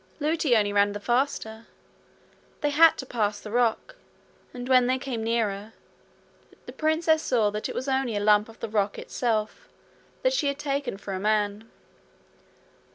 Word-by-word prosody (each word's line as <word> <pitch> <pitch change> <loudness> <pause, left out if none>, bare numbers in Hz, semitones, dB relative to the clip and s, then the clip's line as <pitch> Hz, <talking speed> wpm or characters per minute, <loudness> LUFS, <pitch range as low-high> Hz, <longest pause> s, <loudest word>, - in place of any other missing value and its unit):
Lootie 305 -3 +1
only 205 -1 +1
ran 205 0 +3
the 205 - -5
faster. 230 -2 -1 0.9
They 295 -1 +1
had 325 +3 +6
to 265 - -6
pass 210 -5 -1
the 210 - -9
rock, 245 - 0 0.5
and 245 0 -7
when 255 -1 +4
they 255 +1 +1
came 255 -4 -4
nearer, 220 -2 -1 0.9
the - - -9
princess 315 0 +1
saw 230 -8 +1
it 210 +1 -4
was 260 - -4
only 265 -4 0
a - - 0
lump 210 +1 +3
of 225 - -15
the - - -3
rock 205 -1 0
itself 220 -3 -3 0.5
that - - +3
she 315 -12 0
had 280 0 -1
taken 280 -6 -3
for 195 0 -7
a 185 - -3
man. 210 +1 -1
230 Hz, 160 wpm, -26 LUFS, 210-275 Hz, 0.9 s, had